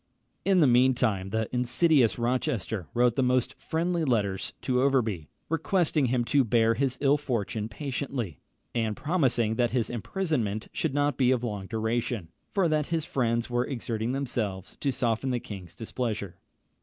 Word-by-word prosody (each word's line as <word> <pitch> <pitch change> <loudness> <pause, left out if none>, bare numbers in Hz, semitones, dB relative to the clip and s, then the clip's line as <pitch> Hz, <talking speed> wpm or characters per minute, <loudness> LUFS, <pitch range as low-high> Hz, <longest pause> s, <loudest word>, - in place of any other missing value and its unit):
In 190 -3 +4
the - - +7
mean 125 +1 +5
time 100 -6 0
the 110 +1 -1
insidious 125 +1 +3
Rochester 120 -5 -1
wrote 120 -1 +3
the - - +2
most 125 -1 +2
friendly 170 +1 -1
letters 105 -8 0
to 125 -1 +1
Overbury, 115 - +1 0.2
requesting 165 -3 +1
him 120 -1 +1
to 140 +2 +3
bear 115 -1 +3
his 130 +2 0
ill 145 +1 +4
fortune 115 -5 -2
patiently, 130 - -4 0.3
and 110 -3 -1
promising 125 -9 +1
that 120 -1 +3
his 120 -2 0
imprisonment 120 - -2
should 150 -4 -1
not 145 0 +1
be 130 -2 +3
of 125 -2 +2
long 105 -5 -3
duration; 110 -4 -2 0.2
for 195 -4 +2
that 155 -2 +1
his 165 -2 -1
friends 115 -3 0
were 120 0 +1
exerting 115 -3 -2
themselves 115 -8 -3
to 140 - 0
soften 120 +1 0
the 125 -1 0
king's 95 -6 -9
displeasure. 110 -4 -4
120 Hz, 160 wpm, -28 LUFS, 110-140 Hz, 0.3 s, the